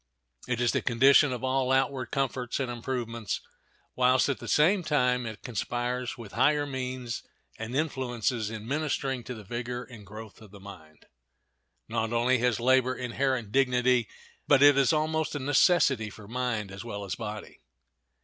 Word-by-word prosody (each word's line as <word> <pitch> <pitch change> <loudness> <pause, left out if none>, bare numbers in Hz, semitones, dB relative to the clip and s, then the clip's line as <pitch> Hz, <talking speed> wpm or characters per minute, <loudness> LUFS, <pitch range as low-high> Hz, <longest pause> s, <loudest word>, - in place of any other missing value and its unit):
It 120 -2 -1
is 120 -1 +2
the - - 0
condition 135 +4 +5
of 125 0 -4
all 130 0 +1
outward 135 -1 +1
comforts 130 -2 -2
and 130 -3 -2
improvements, 115 -3 -3 0.6
whilst, 130 +2 +3
at 140 - -1
the - - -8
same 180 +6 +4
time, 125 -6 +1
it 110 -1 -8
conspires 125 +2 -3
with 115 -5 -10
higher 150 0 +2
means 130 -3 -4 0.4
and 110 +3 -5
influences 125 -6 -1
in 110 0 -7
ministering 135 -3 -1
to 125 - -6
the 110 - -10
vigor 120 +3 -4
and 115 -3 -12
growth 110 +2 -11
of 110 - -13
the 100 +1 -13
mind. 90 -6 -13 0.8
Not 115 0 -2
only 120 +2 +2
has 125 -1 +1
labor 130 +1 +3
inherent 125 -3 -2
dignity, 125 -2 +2 0.4
but 140 -1 +5
it 145 -1 +8
is 135 -2 +4
almost 155 0 0
a - - -2
necessity 135 - +3
for 105 0 -13
mind 115 -4 -2
as 95 0 -8
well 100 -4 -6
as 95 - -4
body. 105 -1 -7
125 Hz, 165 wpm, -28 LUFS, 115-135 Hz, 0.8 s, it